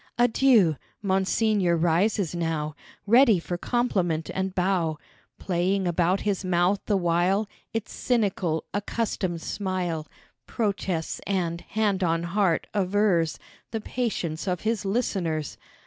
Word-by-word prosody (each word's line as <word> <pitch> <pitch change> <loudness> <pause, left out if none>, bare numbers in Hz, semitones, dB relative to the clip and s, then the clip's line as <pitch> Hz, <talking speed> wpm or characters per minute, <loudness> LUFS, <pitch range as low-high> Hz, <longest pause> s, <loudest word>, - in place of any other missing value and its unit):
Adieu! 235 - +4 0.3
Monseigneur 195 -1 +2
rises 175 +3 +1
now 160 -3 -2 0.3
Ready 235 -1 +6
for 175 +1 -4
compliment 180 -7 0
and 190 0 -2
bow, 180 -4 +1 0.4
Playing 185 +1 0
about 175 +2 +1
his 200 -2 -1
mouth 185 +2 +2
the 205 - +3
while 180 +4 +1 0.2
Its 225 -2 -4
cynical, 195 -9 0
accustomed 200 -4 -2
smile, 180 -5 -2 0.4
Protests 195 -7 -2
and, 175 -3 -1
hand 205 -3 0
on 165 -1 +1
heart, 175 -1 +1
avers 190 -4 +2 0.3
The 225 - -3
patience 205 -8 -3
of 180 -1 -1
his 220 -2 -1
listeners. 185 - -1
185 Hz, 115 wpm, -26 LUFS, 170-210 Hz, 0.4 s, Ready